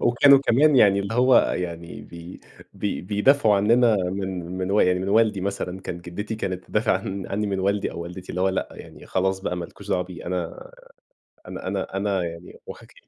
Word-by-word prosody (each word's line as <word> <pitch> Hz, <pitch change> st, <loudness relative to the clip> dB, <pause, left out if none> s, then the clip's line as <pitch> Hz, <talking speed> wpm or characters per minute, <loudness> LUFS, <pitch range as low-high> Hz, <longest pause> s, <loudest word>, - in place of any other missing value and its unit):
وكانوا 135 Hz, +3 st, +6 dB
كمان 140 Hz, +2 st, +3 dB
يعني 100 Hz, -4 st, +5 dB
اللي 100 Hz, +3 st, -4 dB
هو 125 Hz, +1 st, +5 dB, 0.2 s
يعني 85 Hz, -1 st, -5 dB
بي 85 Hz, +1 st, -11 dB, 0.3 s
بي 105 Hz, -, -3 dB
بيدافعوا 105 Hz, +3 st, +3 dB
عنّنا 115 Hz, +2 st, +4 dB
من 95 Hz, -1 st, -3 dB, 0.2 s
من 95 Hz, +1 st, -2 dB
و 105 Hz, -, +3 dB
يعني 90 Hz, 0 st, +3 dB
من 95 Hz, +1 st, -3 dB
والدي 105 Hz, -2 st, +3 dB
مثلًا 95 Hz, -1 st, -4 dB
كانت 85 Hz, -2 st, -7 dB
جدتي 105 Hz, +6 st, -5 dB
كانت 95 Hz, -4 st, -4 dB
تدافع 110 Hz, +1 st, +1 dB
عن 95 Hz, -2 st, -5 dB
عنّي 105 Hz, +1 st, -2 dB
من 95 Hz, -1 st, -2 dB
والدي 100 Hz, +1 st, 0 dB
أو -, -, -7 dB
والدتي، 90 Hz, +2 st, -9 dB
اللي 90 Hz, -, -4 dB
هو 95 Hz, -, +3 dB
لأ 95 Hz, -, -2 dB
يعني -, -, -13 dB
خلاص 95 Hz, +1 st, 0 dB
بقى 90 Hz, -2 st, -3 dB
ما 85 Hz, -, -4 dB
لكوش -, -, -13 dB
دعوة 90 Hz, -, +1 dB
بيه، 90 Hz, -1 st, -10 dB
أنا 90 Hz, -2 st, -4 dB, 0.8 s
أنا -, -, -7 dB
أنا 95 Hz, -, -3 dB
أنا 100 Hz, -2 st, 0 dB
يعني 85 Hz, +1 st, -9 dB
واخك -, -, -11 dB
95 Hz, 195 wpm, -24 LUFS, 90-105 Hz, 0.8 s, وكانوا